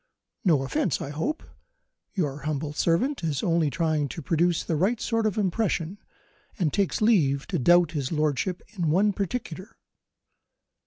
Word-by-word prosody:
No 155 -8 +3
offence, 135 +4 0
I 140 - -5
hope? 215 - -2 0.7
Your 150 -7 -1
humble 150 0 -3
servant 175 - +1
is 150 -5 -1
only 165 -3 +2
trying 155 -2 0
to 165 - -7
produce 170 +3 +1
the 165 - -1
right 200 +9 +1
sort 230 -2 0
of 210 - -2
impression 195 -2 -1 0.6
and 170 -8 0
takes 200 0 0
leave 150 -12 +3
to - - 0
doubt 175 +4 +5
his 140 -5 -3
lordship 155 +3 -1
in 175 -6 -1
one 200 +6 +3
particular." 195 -1 -5
170 Hz, 150 wpm, -26 LUFS, 150-200 Hz, 0.7 s, doubt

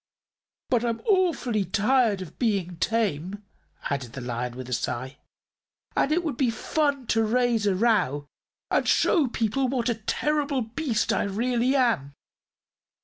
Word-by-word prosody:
But 245 -2 +3
I'm 230 -1 -1
awfully 345 - +1
tired 210 +1 +2
of 170 - -14
being 195 -7 0
tame," 205 -3 -1 0.5
added 130 -4 -3
the 135 - -6
Lion, 120 0 -4
with 130 -1 -7
a 125 - -4
sigh, 130 +3 -3 0.8
"and 280 - +2
it 345 +3 +2
would 300 -7 -3
be 260 -4 +2
fun 280 +3 -1
to 225 0 +2
raise 230 -1 +1
a 195 - +2
row 185 - +1 0.5
and - - +2
show 320 -9 +3
people 235 +3 0
what 250 -2 0
a - - +2 0.2
terrible 295 -3 0
beast 230 0 -1
I - - +1
really 240 +5 0
am." 225 - +1
225 Hz, 145 wpm, -26 LUFS, 185-260 Hz, 0.8 s, But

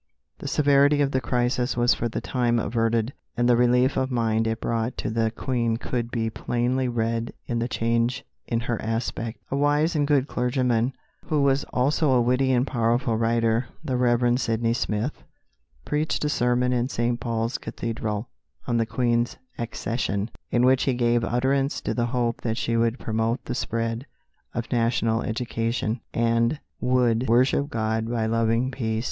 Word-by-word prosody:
The - - -6
severity 145 0 +4
of 140 - 0
the 130 - 0
crisis 125 +1 0
was 120 0 +4
for 120 - -2
the - - -4
time 120 -2 0
averted, 115 +2 0 0.2
and 120 0 +2
the 120 - +5
relief 125 +2 +3
of 130 0 +1
mind 115 -3 +1
it 115 0 -1
brought 115 +1 -2
to - - -3
the 115 0 +1
Queen 115 -1 -1
could 120 0 -3
be 115 -2 -1
plainly 125 +3 -1
read 115 -1 -1
in 120 -1 -2
the 115 - 0
change 115 +2 0 0.2
in 115 -1 0
her 120 -1 -2
aspect. 115 0 -3
A - - 0
wise 145 +4 +2
and 145 -2 +2
good 140 -2 +2
clergyman, 125 -1 0 0.3
who 150 -2 +1
was 140 0 +2
also 140 +2 +1
a 125 - +4
witty 125 +2 +2
and 125 0 +3
powerful 120 -2 +1
writer, 115 +1 +1 0.2
the 130 - -1
Rev. 120 0 +2
Sydney 115 -2 0
Smith, 115 +2 -2 0.6
preached 150 0 -1
a - - +1
sermon 125 -2 +1
in 125 +1 0
St. 120 -1 -1
Paul's 115 +4 -2
Cathedral 110 -1 -4 0.4
on 120 - 0
the 115 -1 +1
Queen's 120 -1 0 0.2
accession, 110 -2 -2 0.2
in 120 +1 +3
which 130 0 +4
he 130 - +1
gave 120 -1 +2
utterance 135 +4 +1
to - - -2
the 120 -1 0
hope 120 -1 -1
that 115 -1 -2
she 115 - 0
would 115 +1 +1
promote 115 +1 -1
the - - -3
spread 115 +1 -2 0.5
of 115 -1 -4
national 115 -1 +1
education, 115 0 -2
and 115 +4 +1 0.2
would 125 -2 +2
"worship 130 +4 +3
God 110 -3 -1
by 115 -2 0
loving 115 +3 +1
peace." 110 -4 -2
120 Hz, 170 wpm, -25 LUFS, 115-130 Hz, 0.6 s, the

